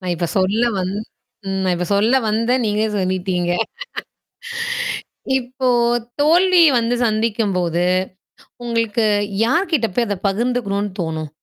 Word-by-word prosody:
நான் 180 -2 -2
இப்ப 170 0 -1
சொல்ல 195 +5 +1 0.2
வந் 185 +1 -2 0.6
ம். 195 - -1
நான் 185 - +2
இப்ப 180 - -2
சொல்ல 220 +6 +3
வந்தேன், 230 +4 +1
நீங்களே 215 +1 +1
சொல்லிட்டீங்க. 185 -1 -1 1.9
இப்போ, 255 +1 -4 0.5
தோல்வி 355 +3 +5
வந்து 235 +1 +1
சந்திக்கும்போது, 205 -6 0 0.8
உங்களுக்கு 230 -1 0 0.4
யார்கிட்ட 315 - +1
போய் 245 - +2
அத 205 - -1
பகிர்ந்துக்கணும்னு 205 -2 -1
தோணும். 160 -2 -3
215 Hz, 110 wpm, -19 LUFS, 185-245 Hz, 1.9 s, தோல்வி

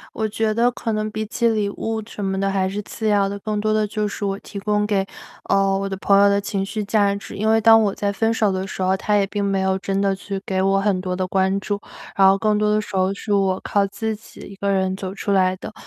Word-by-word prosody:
我 220 - -1
觉 220 0 -1
得 235 +2 +3
可 230 -1 -4
能 215 0 -1
比 215 0 -3
起 235 +1 0
礼 215 -3 +1
物 220 +2 -3
什 210 -2 -7
么 190 0 -1
的 195 0 0
还 190 -1 +1
是 200 +2 -3
次 220 +2 -5
要 200 -2 +3
的， 200 0 -5
更 210 0 -2
多 215 0 +1
的 215 -1 +1
就 210 0 -2
是 205 - -4
我 195 0 -1
提 200 - -8
供 210 +1 0
给， 200 -2 0 0.4
呃， 195 0 +2
我 195 0 -2
的 195 - -3
朋 200 +1 +3
友 200 - +6
的 200 0 +3
情 200 -1 -2
绪 210 +1 -3
价 200 -1 +2
值。 200 - -8
因 215 +2 -1
为 225 0 +4
当 225 0 +7
我 200 -2 0
在 200 -1 -1
分 225 +3 0
手 215 -3 +1
的 190 +1 -3
时 190 - -6
候， 185 +1 +2
她 210 +2 0
也 200 -1 +3
并 205 0 -3
没 195 -1 0
有 190 0 +1
真 195 0 -1
的 195 -1 +2
去 195 +1 -5
给 190 -1 -1
我 195 0 +2
很 200 -2 +1
多 185 0 -3
的 185 0 -1
关 190 +1 +1
注， 205 +1 -2 0.4
然 195 -1 +6
后 195 - +5
更 210 +1 +1
多 210 0 +1
的 215 0 +2
时 205 - -8
候 185 +1 +2
是 205 +1 -6
我 195 -2 +2
靠 200 -1 +1
自 220 +3 -3
己 210 - -15
一 200 - -10
个 200 0 -1
人 190 -1 +1
走 190 0 -6
出 205 - -3
来 185 -1 +3
的。 215 +3 -9
200 Hz, 300 characters per minute, -21 LUFS, 195-215 Hz, 0.4 s, 当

